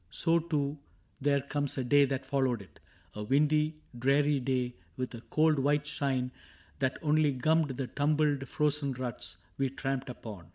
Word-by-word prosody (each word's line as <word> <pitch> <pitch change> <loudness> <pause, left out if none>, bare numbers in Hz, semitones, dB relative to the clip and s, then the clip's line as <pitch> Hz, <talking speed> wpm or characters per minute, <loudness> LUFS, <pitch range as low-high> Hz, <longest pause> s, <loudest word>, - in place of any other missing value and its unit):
So 165 - +2
too 150 -3 -1 0.4
there 140 0 +3
comes 145 0 -2
a 130 - 0
day 140 +3 +5
that 135 0 -3
followed 130 -5 0
it 95 - -20 0.2
— - - -32
A 105 - -6
windy, 150 +6 +2 0.2
dreary 140 +3 +3
day 125 -1 -1 0.2
with 130 0 -3
a 115 - -7
cold 155 +2 +2
white 145 +2 +2
shine 135 -4 -1 0.5
That 130 -1 0
only 150 -1 +3
gummed 150 0 +1
the 135 - -1
tumbled 145 +1 +1
frozen 145 0 +1
ruts 125 -2 -5 0.2
We 135 -1 +2
tramped 135 0 -3
upon. 105 -8 -8
140 Hz, 165 wpm, -31 LUFS, 130-150 Hz, 0.5 s, day